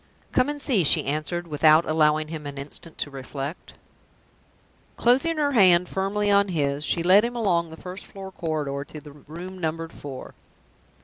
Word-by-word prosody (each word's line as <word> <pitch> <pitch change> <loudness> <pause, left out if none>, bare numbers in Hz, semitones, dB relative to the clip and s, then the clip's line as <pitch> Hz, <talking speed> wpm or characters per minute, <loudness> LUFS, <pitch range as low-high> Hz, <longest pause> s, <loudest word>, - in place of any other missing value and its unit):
"Come 255 +2 +2
and 295 0 -4
see," 245 -10 +3
she 145 - +4
answered, 155 +5 -2
without 155 +1 +4
allowing 155 0 +2
him 155 -2 -6
an 140 -1 -7
instant 145 +4 -9
to 145 - -4
reflect. 135 +3 -7 1.2
Closing 270 +7 +2
her 290 -2 +1
hand 180 -7 +5
firmly 205 +2 -1
on 200 0 +4
his, 145 -5 -1
she 165 +2 0
led 190 +4 +6
him 240 +1 -3
along 175 -8 +1
the 160 - -11
first 185 +3 -9
floor 195 -1 -9
corridor 150 -5 -3
to 150 - -10
the 150 0 -13
room 170 +6 -10
numbered 165 0 -3
Four. 135 -3 -9
165 Hz, 170 wpm, -24 LUFS, 150-195 Hz, 1.2 s, led